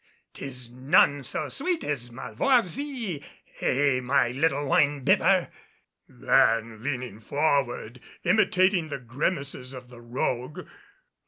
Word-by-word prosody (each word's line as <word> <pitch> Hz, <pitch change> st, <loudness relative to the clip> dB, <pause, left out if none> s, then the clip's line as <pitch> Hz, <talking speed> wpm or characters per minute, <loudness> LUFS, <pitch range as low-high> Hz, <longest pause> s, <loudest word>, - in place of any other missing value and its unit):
'Tis 125 Hz, -3 st, -7 dB
none 140 Hz, +2 st, +3 dB
so -, -, -3 dB
sweet 345 Hz, +3 st, -1 dB
as 125 Hz, -5 st, -3 dB
malvoisie, 235 Hz, -, 0 dB, 0.4 s
eh, 135 Hz, 0 st, +2 dB
my 125 Hz, -1 st, +2 dB
little 145 Hz, +2 st, 0 dB
wine 145 Hz, +1 st, +2 dB
bibber?" -, -, +3 dB, 0.6 s
then, 115 Hz, -1 st, +2 dB
leaning 125 Hz, -5 st, -4 dB
forward, 135 Hz, -2 st, -1 dB, 0.2 s
imitating 185 Hz, -3 st, +3 dB
the 145 Hz, -, -3 dB
grimaces 135 Hz, +1 st, -3 dB
of 125 Hz, -1 st, -10 dB
the 120 Hz, -1 st, -13 dB
rogue. 125 Hz, +3 st, -3 dB
140 Hz, 105 wpm, -26 LUFS, 125-160 Hz, 0.6 s, none